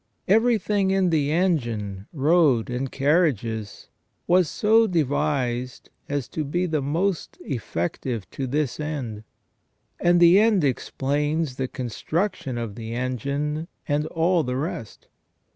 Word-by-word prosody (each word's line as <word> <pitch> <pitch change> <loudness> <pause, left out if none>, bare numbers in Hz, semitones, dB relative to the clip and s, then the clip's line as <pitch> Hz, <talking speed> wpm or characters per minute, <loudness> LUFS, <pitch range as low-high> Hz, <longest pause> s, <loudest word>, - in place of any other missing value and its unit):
Everything 210 -2 +3
in 190 -2 +2
the 150 -3 +1
engine, 115 - -1
road, 145 -5 +3
and 125 +2 -3
carriages 135 - 0 0.4
was 180 -2 +3
so 225 +1 +4
devised 140 - -1 0.2
as 140 -3 -2
to 155 - -3
be 175 +6 -1
the 160 -4 0
most 165 +6 -1
effective 110 - -3
to 135 - -4
this 145 +1 -1
end, 135 -9 -4 0.8
and 175 0 +4
the 175 +3 +7
end 215 -5 +3
explains 145 +2 -1
the 130 - -1
construction 130 - -3
of 115 -3 -4
the 115 +1 -6
engine 140 +6 -2 0.2
and 150 +1 0
all 170 +1 +2
the 125 -3 -2
rest. 130 - -5
145 Hz, 125 wpm, -24 LUFS, 125-175 Hz, 0.8 s, the